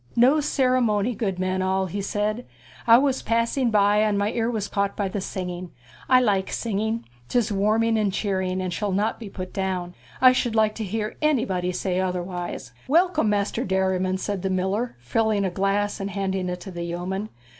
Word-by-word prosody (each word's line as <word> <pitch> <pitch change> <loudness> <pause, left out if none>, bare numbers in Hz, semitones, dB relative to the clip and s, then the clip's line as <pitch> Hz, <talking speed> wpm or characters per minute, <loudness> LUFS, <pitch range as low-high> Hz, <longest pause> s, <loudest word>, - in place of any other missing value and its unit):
'No 255 +6 +5
ceremony, 255 -6 +2
good 200 -5 -2
men 185 0 -1
all,' 190 0 +1
he 200 +3 -4
said; 210 +4 -2 0.4
'I 230 0 +9
was 265 0 +1
passing 230 +2 +1
by, 205 -1 +4
and 210 -1 +2
my 205 +1 +1
ear 230 -1 0
was 215 -4 -2
caught 200 0 -1
by 200 - 0
the 195 +1 -3
singing. 180 -1 -5 0.4
I 255 -1 +7
like 200 -6 +1
singing; 220 +1 -2 0.2
'tis 235 -3 +1
warming 220 +3 +2
and 205 -2 +1
cheering, 190 -2 -1
and 180 -1 -3
shall 205 +2 -1
not 210 +3 0
be 220 -3 -7
put 185 -1 -7
down. 185 -2 -2 0.3
I 255 -1 +8
should 245 -2 0
like 215 -1 +3
to - - 0
hear 215 +2 -3
anybody 200 -12 +1
say 180 0 -1
otherwise.' 180 -1 -3 0.2
'Welcome, 320 - +3
Master 205 -1 0
Derriman,' 190 -1 0
said 200 0 -3
the 190 - -1
miller, 190 +6 -1
filling 205 - 0
a 185 - -1
glass 195 +2 0
and 195 0 -3
handing 190 -2 -2
it 180 0 -4
to 190 - -8
the 175 -1 -6
yeoman. 180 +5 -3
200 Hz, 190 wpm, -24 LUFS, 185-225 Hz, 0.4 s, I